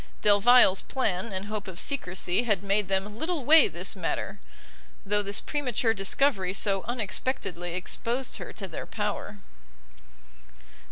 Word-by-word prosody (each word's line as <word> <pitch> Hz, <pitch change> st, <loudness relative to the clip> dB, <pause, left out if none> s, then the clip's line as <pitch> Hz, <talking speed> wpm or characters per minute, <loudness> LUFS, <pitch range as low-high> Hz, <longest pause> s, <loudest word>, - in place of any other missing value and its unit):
Delvile's 205 Hz, -1 st, +6 dB
plan 215 Hz, -5 st, -2 dB
and 190 Hz, +1 st, -4 dB
hope 210 Hz, -1 st, -5 dB
of 185 Hz, -2 st, -8 dB
secresy 185 Hz, -8 st, -1 dB
had 210 Hz, -6 st, 0 dB
made 200 Hz, 0 st, +1 dB
them 195 Hz, +3 st, -2 dB
little 315 Hz, -4 st, -2 dB
weigh 320 Hz, +3 st, +7 dB
this -, -, -4 dB
matter, -, -, -3 dB, 0.7 s
though 205 Hz, +1 st, +2 dB
this 200 Hz, 0 st, -2 dB
premature 250 Hz, -6 st, 0 dB
discovery 195 Hz, -1 st, +1 dB
so 195 Hz, -2 st, 0 dB
unexpectedly 195 Hz, -6 st, -3 dB
exposed 235 Hz, +7 st, -3 dB
her -, -, -7 dB
to 195 Hz, -, -6 dB
their 165 Hz, -, -7 dB
power. 210 Hz, -1 st, -4 dB
205 Hz, 130 wpm, -27 LUFS, 190-245 Hz, 0.7 s, weigh